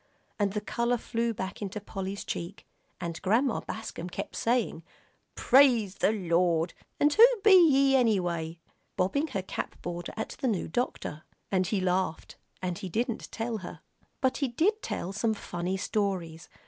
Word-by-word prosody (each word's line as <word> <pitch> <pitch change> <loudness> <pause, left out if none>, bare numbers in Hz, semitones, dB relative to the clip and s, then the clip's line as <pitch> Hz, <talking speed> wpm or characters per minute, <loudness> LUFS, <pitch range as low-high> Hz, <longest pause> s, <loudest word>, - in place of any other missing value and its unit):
And 200 -1 +1
the 210 - -1
color 235 +3 0
flew 235 0 -1
back 190 -2 -5
into 205 +1 -4
Polly's 195 -1 -5
cheek, 175 +4 -5 0.3
and 170 -1 -5
Grandma 225 +5 +2
Bascom 200 -5 -6
kept - - -6
saying, 235 -8 0 0.5
"Praise 245 -7 +5
the 200 - +2
Lord 170 -4 +1 0.3
and 295 0 +4
who 460 +7 +9 0.2
be 415 -2 +7 0.2
ye, 275 -1 +4
anyway?" 175 -9 +1 0.4
bobbing 280 +12 +1
her 195 -10 -3
cap - - -5
border 175 0 -4
at 220 - -3
the 265 - 0
new 205 -7 0
doctor. 160 -7 -3 0.3
And 185 -2 +2
he 210 - 0
laughed 185 -2 -1 0.3
and 180 -2 -2
didn't 235 +4 -2
tell 225 0 -2
her. 180 - -9 0.4
But 260 -1 +2
he 280 - 0
did 375 - +1
tell 185 - -4
some 220 +2 0
funny 180 -1 -3
stories. 185 -5 -2
200 Hz, 155 wpm, -29 LUFS, 180-235 Hz, 0.5 s, who